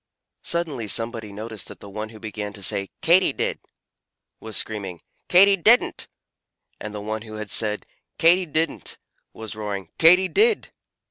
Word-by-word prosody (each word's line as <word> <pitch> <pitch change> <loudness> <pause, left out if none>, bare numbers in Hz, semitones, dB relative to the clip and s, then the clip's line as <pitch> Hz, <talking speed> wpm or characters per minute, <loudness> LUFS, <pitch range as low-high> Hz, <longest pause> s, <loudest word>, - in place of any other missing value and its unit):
Suddenly 155 -10 -2
somebody 115 0 -2
noticed 110 -1 -6
that - - -11
the - - -11
one 105 +2 -6
who 110 -1 -13
began 105 -1 -6
to 100 -2 -8
say 100 +1 0
"Katy 170 -2 +4
did!" - - -2 0.8
was 110 -1 -4
screaming 100 -6 -3 0.3
"Katy 195 +2 +7
didn't!" 225 +7 +4 0.7
and 105 0 -7
the 105 - -5
one 110 +1 -4
who 110 -1 -9
had 110 -1 -6
said 105 -1 +1 0.3
"Katy 175 +2 +4
didn't!" 160 +2 -2 0.3
was 110 -1 -8
roaring 100 -4 -5
"Katy 180 +3 +7
did!" 430 - +2
110 Hz, 150 wpm, -23 LUFS, 105-165 Hz, 0.8 s, Katy